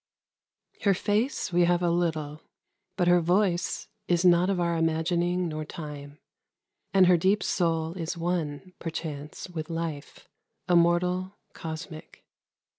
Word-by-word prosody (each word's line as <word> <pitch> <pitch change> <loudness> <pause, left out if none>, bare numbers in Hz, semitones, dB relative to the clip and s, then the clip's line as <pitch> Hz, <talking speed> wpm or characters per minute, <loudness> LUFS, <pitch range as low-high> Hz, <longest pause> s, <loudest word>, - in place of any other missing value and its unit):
Her 200 -2 +3
face 210 +1 -1
we 175 0 +5
have 175 0 +2
a 170 - +2
little, 160 -3 -1 0.6
but 180 -2 +2
her 175 0 +5
voice 175 0 +1 0.2
Is 175 0 +2
not 175 +1 +5
of 195 -2 0
our 170 -1 +1
imagining 170 +2 +1
nor 155 -1 -4
time, 150 -2 -8 0.7
And 190 -1 +6
her 180 -1 +6
deep 195 +4 +2
soul 165 -2 0
is 170 -1 -4
one, 170 0 -3
perchance, 155 -2 -6
with 165 -3 -6
life, 165 -3 -5 0.4
Immortal, 180 +2 +2 0.2
cosmic. 160 0 -8
170 Hz, 125 wpm, -27 LUFS, 160-180 Hz, 0.7 s, And